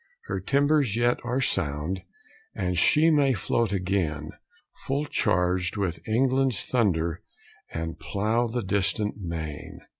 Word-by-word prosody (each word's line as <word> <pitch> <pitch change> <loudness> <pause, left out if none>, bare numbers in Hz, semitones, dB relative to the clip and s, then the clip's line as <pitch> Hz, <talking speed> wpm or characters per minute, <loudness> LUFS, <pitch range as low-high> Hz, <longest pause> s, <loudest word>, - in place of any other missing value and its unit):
Her - - -2
timbers 140 -5 +2
yet 120 +1 +2
are 125 +2 -1
sound, 80 - -1 0.5
And 90 -1 -1
she 155 - +4
may 140 -3 +4
float 115 +2 0
again, 90 -6 -1 0.6
Full 140 +2 0
charg'd 90 -5 0
with 95 -5 -1
England's 130 -1 +2
thunder 85 -9 0 0.5
And 80 0 -4
plough 110 +4 0
the 120 0 -3
distant 100 +2 0
main. 80 -6 -6
100 Hz, 120 wpm, -26 LUFS, 90-125 Hz, 0.6 s, she